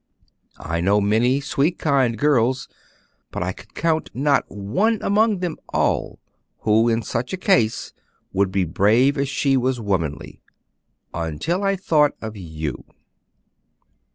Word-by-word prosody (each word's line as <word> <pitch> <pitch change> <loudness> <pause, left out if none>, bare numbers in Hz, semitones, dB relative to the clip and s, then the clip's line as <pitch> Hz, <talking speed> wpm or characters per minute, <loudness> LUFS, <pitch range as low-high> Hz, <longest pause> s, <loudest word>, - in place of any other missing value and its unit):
I 85 +1 -3
know 100 +4 +3
many 115 +6 +2
sweet, 145 +5 0
kind 135 -6 +1
girls, 130 -2 +2 0.6
but - - -4
I - - -2
could - - -15
count 160 -1 0
not 140 +2 +1
one 115 - 0
among 210 -1 +2
them 175 -3 -2
all - - 0 0.4
who 110 +2 +3
in 115 0 0
such 125 +6 -3
a - - -1
case 120 - +1 0.4
would 95 0 +1
be 95 0 +1
brave 110 - +3
as 140 -2 -1
she 140 -1 +1
was 130 -1 0
womanly 85 -10 -3 0.7
until 85 - -2
I 195 0 +2
thought 150 -6 +2
of 110 -1 -7
you." 80 -7 -6
125 Hz, 135 wpm, -22 LUFS, 100-150 Hz, 0.7 s, know